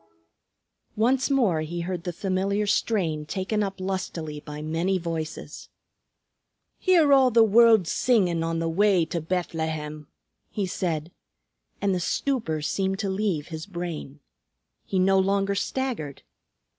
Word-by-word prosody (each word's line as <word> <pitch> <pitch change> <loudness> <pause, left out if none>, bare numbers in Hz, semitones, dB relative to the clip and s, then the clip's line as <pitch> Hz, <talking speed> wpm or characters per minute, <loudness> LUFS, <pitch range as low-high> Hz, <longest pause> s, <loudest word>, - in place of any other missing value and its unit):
Once 255 +5 +2
more 225 - +2
he 170 +2 -4
heard 175 0 -4
the 175 - -1
familiar 195 +3 -1
strain 180 -7 0
taken 195 +7 -2
up 195 -1 -3
lustily 180 -5 -4
by 150 0 -8
many 165 +5 0
voices. 165 -3 -5 1.1
"Hear 335 -6 +4
all 265 -2 +6
the 230 -1 +5
world 225 -3 +5
singin' 185 -10 +2
on 165 0 -1
the 165 0 -1
way 185 0 +3
to 170 +1 -3
Bethlehem!" 160 -3 -3 0.4
he 205 - -2
said, 170 -3 -3 0.7
and 200 -1 +1
the 180 - 0
stupor 175 - -1
seemed 190 +4 -1
to 200 -2 -2
leave 190 -7 -1
his 160 +1 -6
brain. 170 -6 -6 0.7
He 190 - -1
no 190 +1 +4
longer 195 +1 +1
staggered. 200 - -3
185 Hz, 130 wpm, -25 LUFS, 160-205 Hz, 1.1 s, all